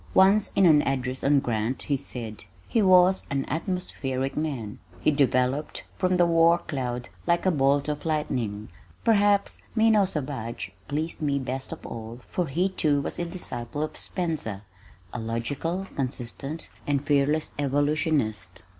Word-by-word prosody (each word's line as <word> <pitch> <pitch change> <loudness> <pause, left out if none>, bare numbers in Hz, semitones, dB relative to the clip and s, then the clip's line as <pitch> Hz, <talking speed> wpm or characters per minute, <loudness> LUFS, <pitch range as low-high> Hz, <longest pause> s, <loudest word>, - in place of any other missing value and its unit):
Once 195 +2 +5
in 195 - +4
an 155 -4 +7
address 130 -2 -2
on 140 0 +5
Grant 115 0 -2
he 145 - 0
said, 115 -6 -6 0.2
"He 230 - +2
was 185 -1 +5
an 135 -1 -1
atmospheric 140 -5 -2
man. 135 -9 -3 0.2
He 155 - +3
developed 135 0 +1
from 185 0 +1
the 175 - +5
war 165 0 +5
cloud 125 -7 -4 0.2
like 170 +1 +2
a 185 - +4
bolt 140 -1 +2
of 150 -1 -3
lightning." 125 -10 -2 0.3
Perhaps 205 -3 +3 0.2
Minot 220 -4 +4
Savage 130 - -4 0.2
pleased 155 +4 -3
me 140 -2 +1
best 130 0 -4
of - - -8
all 115 +1 -7
for 180 -2 0
he 175 +7 +1
too 150 -6 +2
was 140 - -4
a 175 - -1
disciple 145 -6 -4
of 155 - -4
Spencer, 155 - -2 0.5
a 120 - -3
logical, 135 +11 -2
consistent, 135 +3 -3 0.2
and 145 -1 0
fearless 145 +2 +2
evolutionist. 145 - 0
145 Hz, 145 wpm, -26 LUFS, 130-170 Hz, 0.5 s, an